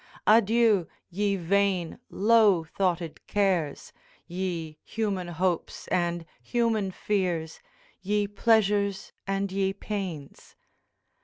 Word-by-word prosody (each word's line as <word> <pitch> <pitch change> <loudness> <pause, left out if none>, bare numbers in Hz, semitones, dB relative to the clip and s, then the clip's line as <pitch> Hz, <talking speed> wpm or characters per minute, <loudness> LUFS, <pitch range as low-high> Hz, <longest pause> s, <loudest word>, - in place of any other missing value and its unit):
'Adieu, 220 -4 +4 0.2
ye 200 +2 0
vain 190 0 0
low 210 -4 +4
thoughted 170 -1 -2
cares, 185 -8 0 0.3
Ye 170 -4 -4
human 200 -5 -2
hopes, 175 0 -2
and 175 -2 0 0.2
human 230 -5 0
fears, 180 -5 -2 0.4
Ye 205 +2 +1
pleasures 205 -2 +1
and 195 0 -1
ye 195 0 0
pains!' 190 -8 -6
195 Hz, 90 wpm, -27 LUFS, 175-205 Hz, 0.4 s, Adieu